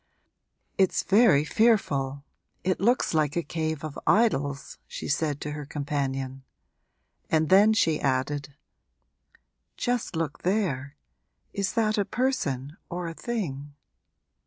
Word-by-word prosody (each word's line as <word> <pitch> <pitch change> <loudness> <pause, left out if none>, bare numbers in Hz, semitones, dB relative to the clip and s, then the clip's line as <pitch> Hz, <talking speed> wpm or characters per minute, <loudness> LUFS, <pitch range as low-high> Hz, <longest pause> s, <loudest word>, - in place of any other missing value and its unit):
'It's 190 -2 +3
very 195 -8 +5
fearful 145 - +2 0.4
it 185 0 0
looks 235 +3 +2
like 150 -2 +1
a 170 - 0
cave 160 -1 -3
of 155 -2 -5
idols!' 145 - +1
she - - -6
said 145 -1 0
to 150 - -4
her 150 0 -5
companion; 135 -2 -3 0.9
and 160 -1 +2
then 200 +3 +7
she 165 -8 +2
added 140 +1 -1 1.2
'Just 245 -6 -1
look 160 -3 -3
there 155 -8 -1 0.6
is 200 -1 -1
that 215 -2 +1
a - - +3
person 150 - -1
or 175 0 -4
a 165 - -5
thing?' 150 - -4
155 Hz, 120 wpm, -27 LUFS, 140-200 Hz, 1.2 s, then